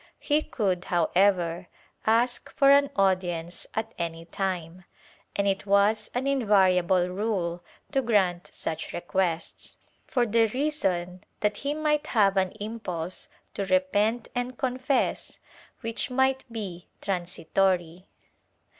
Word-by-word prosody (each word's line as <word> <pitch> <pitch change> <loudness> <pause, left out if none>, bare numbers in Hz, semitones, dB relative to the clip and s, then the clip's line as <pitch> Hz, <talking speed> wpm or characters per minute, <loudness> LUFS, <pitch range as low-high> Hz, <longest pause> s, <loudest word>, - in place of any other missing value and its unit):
He 295 +1 +1
could, 190 -10 -1
however, 175 0 +2 0.4
ask 235 +2 +2
for 275 -1 +6
an 280 0 +5
audience 180 -3 0
at 220 +1 -2
any 165 -1 -3
time, 180 -1 -4 0.5
and 200 0 +1
it 195 +1 -1
was 200 +2 +3
an 250 +2 0
invariable 190 -8 +3
rule 180 -3 -2 0.3
to 270 -2 +2
grant 190 -7 +1
such 160 0 -4
requests, 175 -1 -2 0.3
for 245 -2 +2
the 225 0 +3
reason 185 - -1 0.2
that 210 -1 +1
he 285 +2 -2
might 300 -1 +1
have 200 -4 +3
an 190 -1 +1
impulse 205 -6 -5 0.2
to 200 - -2
repent 205 +5 +1
and 245 0 -3
confess 260 +1 0 0.4
which 230 +2 -2
might 265 +1 +1
be 190 -6 -6
transitory. 180 -1 -1
195 Hz, 120 wpm, -27 LUFS, 180-235 Hz, 0.5 s, for